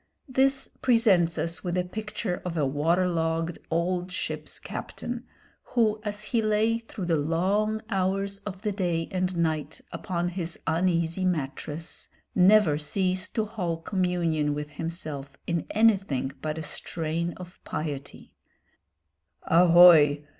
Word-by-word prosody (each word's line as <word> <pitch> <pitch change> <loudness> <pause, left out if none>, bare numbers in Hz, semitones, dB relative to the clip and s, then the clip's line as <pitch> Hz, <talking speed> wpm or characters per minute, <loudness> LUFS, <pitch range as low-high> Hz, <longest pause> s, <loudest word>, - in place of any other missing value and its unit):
This 270 +1 +2
presents 200 -9 +3
us 170 +1 -2
with 180 -1 -2
a 180 - +2
picture 210 0 -4
of 175 -2 -4
a 150 - +2
water 165 +7 +2
logged 165 -1 -1
old 175 +2 -1
ship's - - -4
captain, 245 0 -6 0.4
who, 220 -3 +1
as 210 0 -4
he 225 +2 0
lay 215 +1 +2
through 225 -4 -7
the 170 -2 +2
long 195 +8 0
hours 195 0 -1
of 195 -1 -8
the 210 - 0
day 175 -4 -1
and 185 -1 -1
night 160 -3 -1
upon 175 -1 -2
his 175 -2 -4
uneasy 170 +1 +1
mattress, 155 -1 -3 0.3
never 185 -5 +5
ceased 185 +4 -1
to 220 - +1
hold 175 -7 -4
communion 170 -6 0
with 150 0 -5
himself 155 -4 -6
in 170 -2 -2
anything 195 - +2
but 155 0 -3
a 160 - -4
strain 165 +2 -3
of 180 0 -11
piety 145 -3 -6 1.1
"Ahoy! 165 -4 +7
180 Hz, 130 wpm, -27 LUFS, 165-200 Hz, 1.1 s, Ahoy